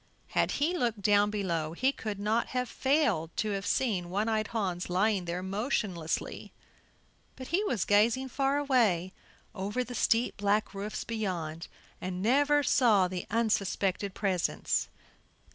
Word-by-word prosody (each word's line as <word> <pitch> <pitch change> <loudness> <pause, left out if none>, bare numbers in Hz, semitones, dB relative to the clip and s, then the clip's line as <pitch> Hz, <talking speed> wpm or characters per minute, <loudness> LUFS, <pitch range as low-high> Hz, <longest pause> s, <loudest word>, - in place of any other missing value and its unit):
Had - - +1
he 325 +5 +1
looked 230 - -1
down 205 0 +4
below 170 -7 -2
he 260 +10 +2
could 215 -6 -5
not 215 +3 +1
have 250 0 0
failed 250 - +1
to 215 -1 0
have 195 0 -3
seen 195 -9 0
One 205 +4 0
eyed 215 -1 0
Hans 185 -7 -2
lying 190 +1 +1
there 175 +2 -3
motionlessly; 195 - -2 0.8
but 260 - -9
he 375 +5 +1
was 235 - 0
gazing 230 +6 +3
far 275 +2 +1
away 225 -11 +2 0.4
over 210 +5 -2
the 245 +1 -8
steep 235 +1 +1
black 205 +1 +1
roofs 200 +2 -4
beyond, 175 -8 -4 0.3
and 180 0 -4
never 290 +5 +3
saw 215 -10 +4
the 180 -1 -5
unsuspected 200 -3 0
presence. 190 -4 0
210 Hz, 145 wpm, -30 LUFS, 185-240 Hz, 0.8 s, down